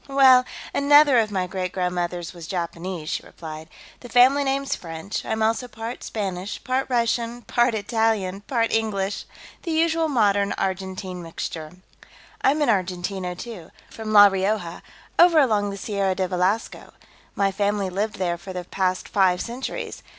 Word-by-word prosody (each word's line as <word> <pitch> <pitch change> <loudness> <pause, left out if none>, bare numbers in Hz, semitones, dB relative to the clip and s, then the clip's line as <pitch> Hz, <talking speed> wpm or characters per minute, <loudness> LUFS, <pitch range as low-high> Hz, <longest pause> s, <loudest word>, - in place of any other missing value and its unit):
"Well, 265 -2 +6 0.3
another 285 -2 +6
of 220 -2 +1
my 190 -3 -1
great 185 0 -4
grandmothers 180 -1 -2
was 170 -2 -10
Japanese," 170 -1 -4
she - - -2
replied. 160 -1 -9 0.3
"The 245 - -11
family 255 +4 +5
name's 275 0 -1
French. 165 +3 -6
I'm 220 0 -1
also 225 +3 +1
part 225 +1 -7
Spanish, 195 -2 -4
part 260 +1 -1
Russian, 235 0 0
part 240 0 +2
Italian, 210 -3 0
part 230 +1 -1
English... 210 -3 -1 0.4
the 345 - -6
usual 325 0 +2
modern 205 -7 +2
Argentine 190 -1 -4
mixture." 160 -1 -6 0.7
"I'm 295 +3 +3
an 280 - +1
Argentino, 185 -2 -1
too. 185 -4 -9 0.2
From 220 -1 -6
La 205 -1 +9
Rioja, 195 -2 0 0.4
over 345 -1 +7
along 215 -8 +3
the 200 - -6
Sierra 195 -2 -1
de 185 0 0
Velasco. 185 +5 -1 0.4
My 195 -1 +2
family 200 -1 -1
lived 205 +3 -2
there 175 -3 -2
for 185 +2 -8
the 180 -1 -4
past 185 +1 -1
five 185 -3 +2
centuries. 245 +3 -5
200 Hz, 150 wpm, -23 LUFS, 185-235 Hz, 0.7 s, La